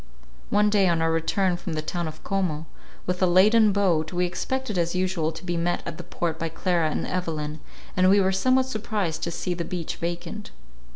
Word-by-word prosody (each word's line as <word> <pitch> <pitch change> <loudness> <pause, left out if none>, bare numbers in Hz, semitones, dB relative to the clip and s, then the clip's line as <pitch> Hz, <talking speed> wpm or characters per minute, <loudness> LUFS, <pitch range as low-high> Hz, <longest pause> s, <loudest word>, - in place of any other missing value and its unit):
One 210 0 +3
day, 200 -2 +4
on 170 -2 +2
our 165 0 +2
return 175 +3 +1
from 175 - -5
the 155 0 -2
town 175 +1 -2
of 155 - -9
Como, 175 -6 -1 0.4
with 180 0 -2
a 185 - +5
laden 210 +5 +5
boat, 180 -6 +1
we 180 0 +1
expected 245 +6 -3
as 170 0 0
usual 180 -4 0
to 165 +3 -10
be 175 -1 -1
met 175 +1 0
at 170 0 -6
the - - -6
port 170 -1 -3
by 165 - -2
Clara 170 0 +1
and - - -2
Evelyn, 155 -4 -3 0.4
and 185 0 +4
we 200 +1 +6
were 190 -1 +3
somewhat 255 +7 +3
surprised 210 -9 -2
to - - -1
see 175 +2 -2
the 170 -1 -3
beach 170 -2 -4
vacant. 175 +4 -4
175 Hz, 210 wpm, -25 LUFS, 165-195 Hz, 0.4 s, we